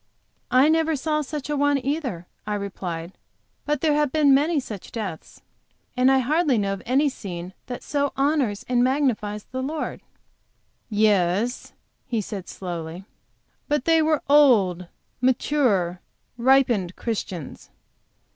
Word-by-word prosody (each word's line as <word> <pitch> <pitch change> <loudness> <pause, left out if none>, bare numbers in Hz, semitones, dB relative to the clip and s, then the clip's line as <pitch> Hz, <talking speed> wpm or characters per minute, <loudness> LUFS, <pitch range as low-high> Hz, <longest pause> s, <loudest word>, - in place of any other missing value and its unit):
"I 255 +4 +5
never 320 0 +2
saw 305 +2 -1
such 295 -1 -5
a 295 - -1
one, 285 0 +2
either," 265 - -2 0.2
I 210 - -1
replied; 185 -4 -5 0.6
"but 295 +1 -1
ere 305 - +4
have 295 -2 +1
been 295 -2 +4
many 300 +3 +3
such 215 -7 -8
deaths, 205 -8 -7 0.5
and 255 +1 +4
I 270 - +5
hardly 290 +1 +2
know 200 -1 0
of 195 - -6
any 270 +4 +3
scene 185 -8 -6
that 245 - -6
so 285 -1 0
honors 275 -7 +1
and 245 -1 +2
magnifies 245 -6 0
the 260 +1 -5
Lord." 300 +4 -4 0.9
"Yes," 210 +1 +1 0.3
he 230 - -1
said, 195 -3 -6
slowly; 175 0 -6 0.6
"but 295 -3 0
they 325 -1 +4
were 310 -1 +1
old, 215 -12 +4 0.3
mature, 240 -9 +1 0.3
ripened 240 -7 +3
Christians." 190 - -5
250 Hz, 135 wpm, -24 LUFS, 200-290 Hz, 0.9 s, I